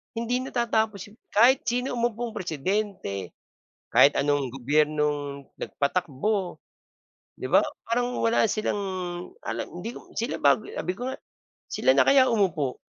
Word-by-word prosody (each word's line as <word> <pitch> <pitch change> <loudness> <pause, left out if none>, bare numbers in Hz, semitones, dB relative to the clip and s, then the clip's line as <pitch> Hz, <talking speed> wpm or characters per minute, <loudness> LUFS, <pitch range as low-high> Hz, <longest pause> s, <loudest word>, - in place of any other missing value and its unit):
Hindi 245 +3 -1
natatapos 220 -5 -1
yun. 215 - -20 0.2
Kahit 245 +5 +5
sino 250 +1 -1
umupong 235 0 -2
Presidente, 175 - -3 0.6
kahit 140 - +6
anong 145 -2 +1
gobyernong 145 +1 0
nagpatakbo, 180 +5 -1 0.7
'di - - -6
ba? - - +5 0.2
Parang 245 +1 0
wala 230 0 +3
silang 215 -1 0 0.6
alam, 115 +1 -3 0.2
hindi 230 +6 -6
ko - - -13
sila 235 - -2
bago 140 -2 +3
sabi 180 - -3
ko 245 +7 -5
nga, 265 - -4 0.5
sila - - +2
na - - +4
kaya 265 -2 +6
umupo. 170 - 0
205 Hz, 130 wpm, -26 LUFS, 145-235 Hz, 0.7 s, kahit